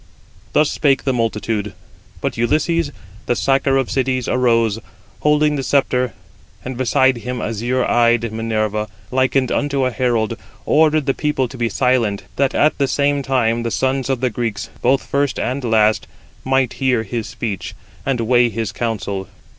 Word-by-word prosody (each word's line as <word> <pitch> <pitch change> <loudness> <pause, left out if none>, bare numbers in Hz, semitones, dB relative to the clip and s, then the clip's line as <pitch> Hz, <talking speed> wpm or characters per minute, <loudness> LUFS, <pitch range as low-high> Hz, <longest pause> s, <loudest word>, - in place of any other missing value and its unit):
Thus 150 -1 +3
spake 140 -3 +2
the 135 - +1
multitude; 110 -3 -2 0.5
but - - -2
Ulysses, 155 +6 +1 0.4
the 120 - +2
sacker 135 +1 +2
of 135 -2 -1
cities, 130 -2 0
arose, 115 -3 +2 0.4
holding 150 0 +2
the - - -1
sceptre, 125 -4 +1 0.5
and 130 0 -4
beside 130 +1 +2
him 125 +1 -4
azure 120 +4 -1
eyed 120 -1 +2
Minerva, 110 -1 -1 0.2
likened 130 0 +1
unto 140 -2 0
a 130 - 0
herald, 115 -2 0 0.3
ordered 155 -1 +3
the 135 - +2
people 150 -3 0
to 130 - -10
be 120 -2 -1
silent, 115 -3 +1
that 135 -1 +1
at 150 0 +2
the 140 - +2
same 145 +1 +1
time 120 -4 +1
the 115 - -2
sons 130 +2 0
of 130 -2 0
the 125 -2 +1
Greeks, 115 -2 -3
both 130 +2 +2
first 140 -1 0
and 130 +2 -2
last, 110 -2 +2 0.4
might 130 -2 +1
hear 125 -4 +2
his 115 +1 -4
speech, 100 -2 -5 0.3
and 135 -4 0
weigh 120 +1 +3
his 110 -1 -3
counsel. 100 -4 -3
125 Hz, 160 wpm, -19 LUFS, 115-135 Hz, 0.5 s, Thus